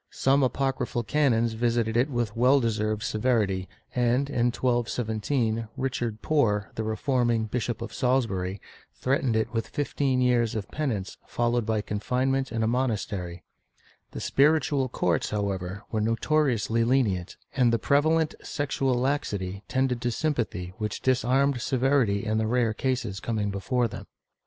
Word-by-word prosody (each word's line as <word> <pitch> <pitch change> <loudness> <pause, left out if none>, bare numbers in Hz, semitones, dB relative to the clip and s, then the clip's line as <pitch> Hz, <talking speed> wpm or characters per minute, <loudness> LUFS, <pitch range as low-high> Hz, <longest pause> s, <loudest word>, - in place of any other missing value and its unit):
Some 135 +1 +2
apocryphal 130 -2 0
canons 120 -5 +2
visited 115 -1 0
it 125 +5 +3
with 120 -5 -2
well 130 +4 +5
deserved 110 -2 -1
severity 105 -5 0 0.2
and, 125 +3 +1
in 120 -3 +2
1217, 115 -1 0
Richard 120 -4 -2
Poore, 110 -10 +1
the 110 - -3
reforming 120 0 +1
Bishop 115 0 -3
of 115 - -7
SaUsbury, 105 -7 0 0.4
threatened 130 -3 0
it 110 +2 0
with 115 -1 -1
fifteen 140 -2 0
years 120 -3 +2
of 105 -3 -4
penance 115 -11 -3
followed 120 -1 0
by 110 -1 +1
confinement 130 +6 -1
in 115 -1 -1
a - - +2
monastery/ 105 -8 -2 0.7
The - - -7
spiritual 140 -2 +2
courts, 85 -8 0
however, 100 -1 -3
were 110 - 0
notoriously 115 -1 +1
lenient, 115 -8 +1 0.2
and 125 -3 +4
the 115 - +3
prevalent 155 +4 +2
sexual 135 -3 -1
laxity 105 -8 -1
tended 130 -2 0
to 120 - 0
sympathy 115 - -2
which 105 -1 -3
disarmed 130 +1 +2
severity 130 -6 +1
in 110 0 0
the 110 - 0
rare 115 -1 +1
cases 120 -5 -2
coming 105 -1 -2
before 120 +5 0
them. 110 - -9
120 Hz, 140 wpm, -27 LUFS, 110-130 Hz, 0.7 s, well